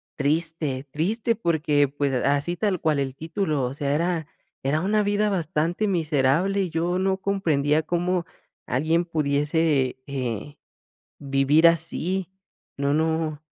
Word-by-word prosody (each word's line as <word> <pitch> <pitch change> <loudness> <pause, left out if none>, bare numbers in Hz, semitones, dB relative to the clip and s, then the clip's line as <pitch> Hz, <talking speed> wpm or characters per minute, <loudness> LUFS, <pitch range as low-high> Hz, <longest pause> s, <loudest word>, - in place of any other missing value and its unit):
triste, 150 -2 -1
triste 215 - 0
porque 155 - +1
pues 140 0 -1
así 145 +5 +1
tal 195 -2 0
cual 155 -3 +1
el 135 -1 -2
título, 160 -3 -1
o 125 - -3
sea, 140 0 -1
era 170 +1 0 0.4
era 140 +3 +1
una 210 +4 +1
vida 205 +1 +1
bastante 175 +2 0
miserable 165 +3 +1
y 185 - -1
yo 170 +3 -1
no 190 0 +1
comprendía 160 -6 +1
cómo 175 +1 0 0.4
alguien 160 +7 +1
pudiese, 150 -3 +1
eh, 135 +1 -4 0.6
vivir 140 +3 +3
así. 170 +2 -1 0.5
No 140 0 0
no 160 -1 0
160 Hz, 130 wpm, -24 LUFS, 145-175 Hz, 0.6 s, vivir